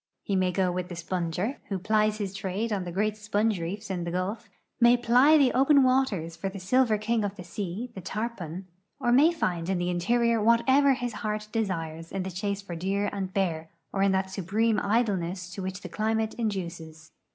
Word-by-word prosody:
He 200 - -1
ma}^ 185 -1 +2
go 185 0 +1
with 180 0 -3
the 175 - -6
sponger, 175 - -2
who 195 - -1
plies 215 +2 +1
his 200 -3 -4
trade 200 +3 -2
on 190 -3 -2
the 175 - -5
great 210 +4 0
S})onge 210 -2 0
reef 200 +5 -5
in 180 -2 -2
the 170 - -3
Gulf; 190 +5 -3 0.3
may 240 0 +6
ply 250 +6 +5
the 275 -4 +4
open 275 +1 +5
waters 240 -11 +1
for 195 +4 -3
tlie 195 +1 -8
silver 220 +4 +2
king 220 +1 0
of 205 -1 -3
the 180 - -9
sea, 200 +6 -5
the 190 - -7
tarpon, 190 -3 -5 0.3
or 240 -3 +1
may 285 +7 +6
find 175 - -2
in 190 - +1
the 175 0 -1
interior 230 +6 +2
whatever 260 +5 +4
his 245 -2 -4
heart 215 -1 -3
desires 165 -7 -3
in 195 -1 -2
the 190 - -5
chase 200 +2 -3
for 175 -3 -6
deer 195 +4 -1
and 195 -2 -3
bear, 165 -5 -1 0.2
or 195 - 0
in 195 0 +4
that 190 0 0
'supreme 210 +4 +1
idleness 190 -5 0
to 195 - -6
which 190 +1 -5
the - - -7
climate 220 0 -1
induces. 170 -7 -5
200 Hz, 205 wpm, -27 LUFS, 180-225 Hz, 0.3 s, may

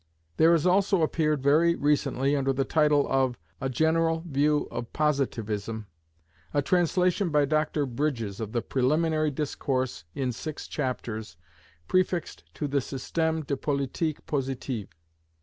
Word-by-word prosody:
There 165 +2 +6
has 165 -1 +2
also 190 -1 +3
appeared 155 -3 +1
very 160 +4 +4
recently, 140 -2 +1
under 135 -1 +1
the 135 0 0
title 150 -1 +3
of 130 -2 +1 0.2
"A 135 - -1
General 165 +3 +1
View 150 0 +2
of 120 - -5
Positivism," 115 -7 -1 0.7
a 145 - +4
translation 180 +3 +2
by 150 -2 +3
Dr 155 0 +1
Bridges, 120 -6 -2
of 110 -2 -4
the 120 0 -1
Preliminary 155 +4 +1
Discourse 130 - -2
in 130 -2 -1
six 155 +5 -6
chapters, 115 - -4 0.5
prefixed 185 -2 0
to 150 - -2
the 140 0 +1
Système 160 +4 -2
de 140 - -1
Politique 140 +3 -2
Positive. 130 - -3
145 Hz, 130 wpm, -27 LUFS, 130-160 Hz, 0.7 s, There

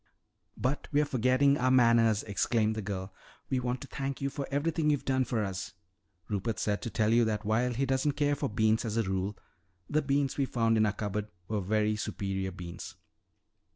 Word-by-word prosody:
"But 130 +4 -1
we're 150 +1 +3
forgetting 130 +2 +3
our 130 +1 +2
manners!" 115 -4 +4
exclaimed 110 +2 +1
the 110 - -3
girl. 95 -1 -5 0.4
"We 130 - +2
want 125 0 -2
to - - -8
thank 135 0 -4
you 140 0 -2
for 140 -1 -4
everything 150 +2 0
you've 145 -2 +1
done 130 -1 +2
for 115 -4 -1
us. 95 0 -4 0.5
Rupert 105 +2 -2
said 105 -1 -1
to 120 - -4
tell 110 0 +1
you 120 0 +5
that 110 -1 -2
while 115 +4 +2
he 135 +3 +1
doesn't 135 +2 +1
care 145 0 +1
for 145 - -1
beans 110 +2 +2
as 110 -1 -2
a 115 - +3
rule, 95 +1 -2 0.5
the 155 +1 +1
beans 140 -1 0
we 135 - +3
found 115 -2 +2
in 110 -1 +4
our - - +2
cupboard 105 0 -3 0.2
were 105 -2 -1
very 105 +2 +1
superior 95 -2 -3
beans." 85 -1 -8
115 Hz, 195 wpm, -30 LUFS, 105-135 Hz, 0.5 s, you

